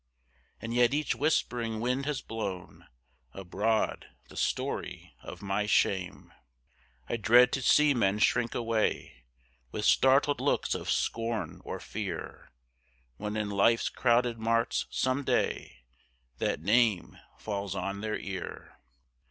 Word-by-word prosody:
And 115 +1 -5
yet 120 +2 +3
each 150 0 0
whispering 120 -7 0
wind 125 +4 -1
has 150 -2 -2
blown 100 -5 -6 0.5
Abroad 100 +4 -1 0.2
the - - -14
story - - -3
of - - -10
my 100 +1 -1
shame. 95 -3 0 0.7
I 120 - -2
dread 120 +4 +6
to 135 - 0
see 150 +3 +5
men 100 -5 +1
shrink 120 +2 +1
away 110 - -1 0.5
With 105 - -3
startled 140 +2 +4
looks - - +1
of - - -5
scorn 115 -1 -2
or - - -5
fear, 100 -6 -6 0.7
When 105 +4 -4
in 105 -1 -2
life's 110 +4 +3
crowded 120 -1 +1
marts 115 +1 0
some 130 +2 0
day, - - -1 0.6
That - - -1
name 110 -1 +2 0.2
falls 100 -2 -4
on 100 +2 -3
their 110 0 -2
ear. 95 -3 -7
115 Hz, 125 wpm, -29 LUFS, 100-125 Hz, 0.7 s, dread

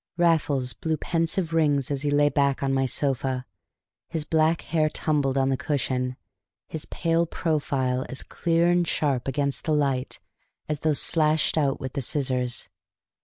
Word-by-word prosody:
Raffles 150 -7 +2
blew 160 -2 -2
pensive 165 +1 -1
rings 145 -4 +2
as 140 -2 -1
he 145 - 0
lay 145 0 +4
back 140 -2 +1
on 135 0 +1
my 135 0 +2
sofa, 130 -1 -1 0.6
his 160 -3 -3
black 160 +1 +2
hair 155 -2 +1
tumbled 145 -4 0
on 135 0 +2
the 135 - +1
cushion, 130 -4 -1 0.5
his 160 -1 -6
pale 165 0 0
profile 135 -6 -1
as 135 - -5
clear 170 0 +1
and 175 -1 +2
sharp 135 -6 0
against 140 0 -1
the 155 - +1
light 135 -3 0 0.5
as 150 -1 -2
though 155 +1 +2
slashed 155 +1 +2
out 140 -4 +1
with 130 -1 -5
the 140 - -2
scissors. 130 -2 -1
145 Hz, 160 wpm, -25 LUFS, 135-160 Hz, 0.6 s, lay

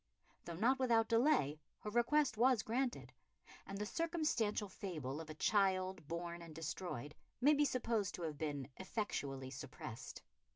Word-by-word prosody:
Though 170 - -5
not 245 +9 +3
without 230 -3 +3
delay, 230 - +3 0.2
her 210 - -4
request 255 +5 +3
was 240 0 +4
granted, 245 +2 -1 0.5
and 195 - -5
the 210 - -2
circumstantial 300 -9 0
fable 160 -7 -4
of 160 - -9
a 155 - -6
child 185 -3 +2
born 170 +1 -4
and 165 -2 -10
destroyed 155 -3 -4 0.3
may 285 +5 +6
be 295 0 +4
supposed 230 -6 0
to 175 - -6
have 155 -3 -3
been 145 -4 -2
effectually 140 - -3
suppressed. 130 -4 -7
195 Hz, 150 wpm, -38 LUFS, 155-235 Hz, 0.5 s, may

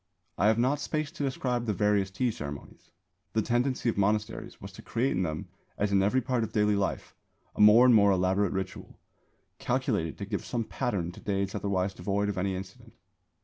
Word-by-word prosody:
I 100 - +2
have 110 +1 +4
not 130 +5 +2
space 155 0 -2
to - - -5
describe 125 -3 -1
the 105 - 0
various 100 0 +2
tea 120 +6 0
ceremonies. 70 -7 -9 0.4
The 110 - +1
tendency 125 +2 0
of 115 - 0
monasteries 105 +2 -1
was - - -9
to - - -12
create 125 +4 -1
in 90 - 0
them 80 -3 -3 0.3
as 105 0 0
in 100 -1 +4
every 105 +7 +2
part 120 -1 0
of 110 - -4
daily 105 -1 +3
life 100 -1 -2 0.4
a - - -1
more 105 +4 +8
and 125 - +6
more 100 -2 +6
elaborate 95 +1 +2
ritual, 95 -1 -5 0.6
calculated 80 -2 -1
to - - -5
give - - -3
some 120 -2 -2
pattern 95 -6 -2
to - - -13
days 100 -1 -2
otherwise 95 -1 -1
devoid 100 +1 -1
of 100 - -2
any 95 0 -1
incident. 95 +1 -9
105 Hz, 195 wpm, -28 LUFS, 95-120 Hz, 0.6 s, more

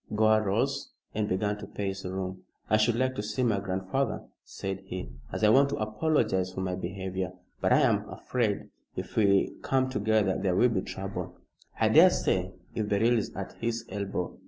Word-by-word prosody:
Gore 110 0 +4
rose 100 -2 -1 0.2
and 105 0 -1
began 105 +2 0
to 105 - -7
pace 100 -1 -4
the 90 - -5
room. 95 0 -4 0.3
"I 110 - +6
should 110 +2 +3
like 130 +2 +1
to - - 0
see 105 +4 -2
my 110 -5 +2
grandfather," 95 +7 -2 0.2
said 95 0 -5
he, 90 -9 -7 0.2
"as - - -4
I 105 - +7
want 140 +5 +6
to 140 - -1
apologise 110 - +1
for 95 - -4
my 90 -1 -1
behavior. 95 0 -4 0.3
But - - +2
I - - +5
am - - +2
afraid 115 -5 -2 0.2
if - - -6
we 100 -3 +3
come 130 -1 +1
together 105 -3 +2
there 95 -2 +1
will 125 +6 +5
be 100 -5 0
trouble." 95 -2 -6 0.4
"I - - +4
daresay - - +5 0.2
if 105 -1 -2
Beryl 110 +4 +3
is 110 - 0
at - - -5
his 115 0 -2
elbow. 100 -4 -3
105 Hz, 185 wpm, -29 LUFS, 95-110 Hz, 0.4 s, I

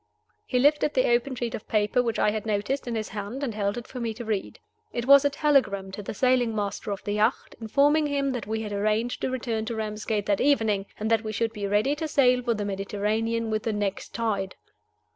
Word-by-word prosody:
He 250 - 0
lifted 295 +3 +3
the 255 - +3
open 255 +3 0
sheet 235 -1 -3
of 215 - -6
paper 215 +4 +2
which 230 -3 -1
I 210 - +3
had 215 -1 -3
noticed 215 +6 -1
in 235 - -2
his 215 -1 -3
hand, 210 +7 -5
and 245 -5 -2
held 205 +1 -1
it 240 - -6
for 255 - -8
me 230 -2 -3
to 235 - -7
read. 215 -3 -3 0.3
It 240 - -3
was 280 +1 +8
a 285 - +3
telegram 265 -10 +1
to 200 - -6
the 205 - -6
sailing 250 -1 +2
master 205 0 -3
of 200 -1 -4
the 205 - -3
yacht, 215 +4 0
informing 290 +7 +3
him 280 -1 0
that 245 -5 -4
we 220 +1 -2
had 210 -1 -5
arranged 215 +4 0
to - - 0
return 235 -4 -2
to 230 +1 -3
Ramsgate 215 -1 -2
that 200 -2 +1
evening, 220 -8 +2
and 220 +2 -1
that 225 0 +3
we 215 - -3
should 225 +1 -1
be 205 -2 -3
ready 210 +8 +2
to 315 - -2
sail 250 -4 +4
for 240 -2 0
the 205 -1 -3
Mediterranean 210 +3 -1
with 215 0 0
the 225 0 -2
next 205 -2 -3
tide. 205 -5 -1
225 Hz, 235 wpm, -26 LUFS, 210-250 Hz, 0.3 s, was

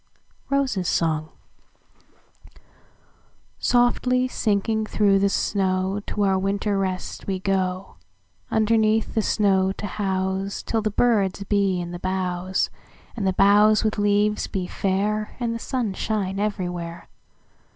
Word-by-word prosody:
ROSES' 265 -10 0 2.7
SONG"SOFTLY 250 +1 +2
sinking 220 -2 0
through 200 -2 +3
the 200 0 +3
snow, 190 0 0
To 205 - -1
our 190 -1 +2
winter 200 +1 0
rest 185 -1 -4
we 195 -1 -1
go, 185 0 -2 0.5
Underneath 220 0 +2
the 220 - +2
snow 195 -3 +2
to 205 - -6
houseTill 195 +2 -2
the 215 - +1
birds 205 -3 +1
be 200 -2 +1
in 175 0 -5
the 175 - -6
boughs, 185 0 -1 0.4
And 205 -4 -1
the 190 - +2
boughs 205 +3 +5
with 215 -1 0
leaves 205 +1 +2
be 185 -2 -3
fair, 205 +3 -1
And 235 -2 -1
the 230 - -4
sun 235 -5 -2
shine 195 -1 -2
everywhere. 180 -5 -3
200 Hz, 120 wpm, -23 LUFS, 190-215 Hz, 2.7 s, boughs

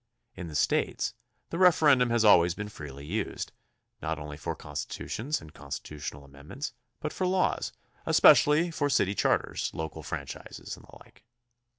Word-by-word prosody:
In 90 - -6
the 75 - -8
States - - +1 0.4
the 170 - -3
referendum 150 -9 +5
has 115 -1 +2
always 85 -4 +6
been 105 0 -5
freely 70 -6 -9
used, 100 +6 -3 0.5
not 80 0 -2
only 75 -1 -7
for 75 - -4
constitutions 145 +7 -4
and 80 -1 -13
con 70 -2 -13
stitutional 75 0 -6
amendments 70 - -7 0.3
but 155 - -4
for 185 - -1
laws, 185 0 +1 0.4
especially 155 +4 +6
for 145 -3 0
city 100 -7 +2
charters, - - +1
local 80 -1 -5
franchises, - - -6
and - - -17
the - - -15
Uke. - - -23
100 Hz, 155 wpm, -29 LUFS, -, 0.5 s, always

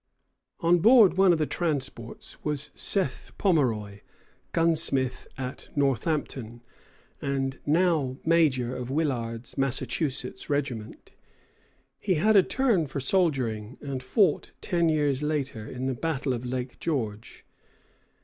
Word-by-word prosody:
On 170 +1 +4
board 225 -1 +7
one 190 -1 +5
of 170 - +3
the 155 - +1
transports 140 -8 -4
was 150 -1 -3
Seth 190 -10 -2
Pomeroy, 115 - +1 0.5
gunsmith 150 -6 +1
at 130 0 -6
Northampton, 135 -4 -1 0.6
and 135 -1 -2
now 155 -5 +2
major 140 -7 +3
of 125 -1 -5
Willard's 125 -6 -2
Massachusetts 135 0 -2
regiment. 130 -7 -3 0.9
He 190 -3 +1
had 215 +8 +3
a 195 - +9
turn 220 - +1
for 135 +1 -4
soldiering, 130 - 0
and 135 -3 -4
fought, 150 - +1
ten 170 -3 +1
years 145 -3 +1
later, 140 -7 -2
in 125 +1 -5
the 130 - 0
battle 135 -1 -1
of 120 0 -4
Lake 125 0 -4
George. 115 -9 -3
140 Hz, 120 wpm, -27 LUFS, 125-165 Hz, 0.9 s, a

